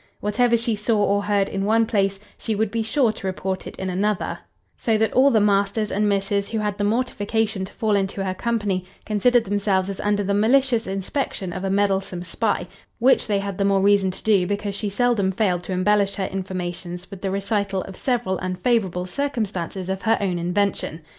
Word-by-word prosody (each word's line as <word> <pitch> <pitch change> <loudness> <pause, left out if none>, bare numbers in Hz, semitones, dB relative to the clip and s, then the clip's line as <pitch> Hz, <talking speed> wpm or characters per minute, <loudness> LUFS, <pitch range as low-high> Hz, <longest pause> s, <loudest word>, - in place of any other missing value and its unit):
Whatever 235 +3 +2
she 230 -1 -1
saw 210 +2 0
or 205 0 +2
heard 200 -1 +1
in 195 - -3
one 225 +2 +3
place, 195 -3 0 0.2
she 220 - -3
would 215 0 0
be 230 - -1
sure 230 +1 +2
to 205 -3 -6
report 190 0 -3
it - - -8
in 190 - -4
another; 195 +2 -1 0.4
so 225 -2 +1
that 220 0 +1
all 265 +2 +6
the 230 -5 +4
masters 205 +1 +1
and 210 +1 +1
misses 200 0 0
who 225 - -2
had 210 -1 -2
the - - +1
mortification 220 -2 0
to - - -13
fall 220 -3 +1
into 195 0 -1
her 190 -1 -1
company, 205 -3 -1 0.2
considered 230 +3 +3
themselves 200 -2 0
as 195 - -8
under 205 0 +1
the 200 +1 0
malicious 235 +3 +3
inspection 195 -1 -3
of 185 - -5
a 195 - -1
meddlesome 195 -2 0
spy; 180 +1 -1 0.3
which 260 +3 +3
they 205 -2 +1
had 200 -1 -4
the - - +2
more 195 -1 +3
reason 200 -1 +4
to 185 - -8
do, 200 -5 +3
because 205 0 -2
she 205 +1 -3
seldom 210 -2 +1
failed 185 -3 +1
to 180 - -7
embellish 200 +2 +2
her 195 - -2
informations 180 -1 -5
with 195 -2 -9
the 195 - -1
recital 200 0 -1
of 195 - -9
several 235 -7 -1
unfavourable 185 0 0
circumstances 200 -7 -3
of 190 0 -3
her 225 0 +2
own 185 -3 -1
invention." 180 -2 -1
200 Hz, 200 wpm, -23 LUFS, 190-220 Hz, 0.4 s, all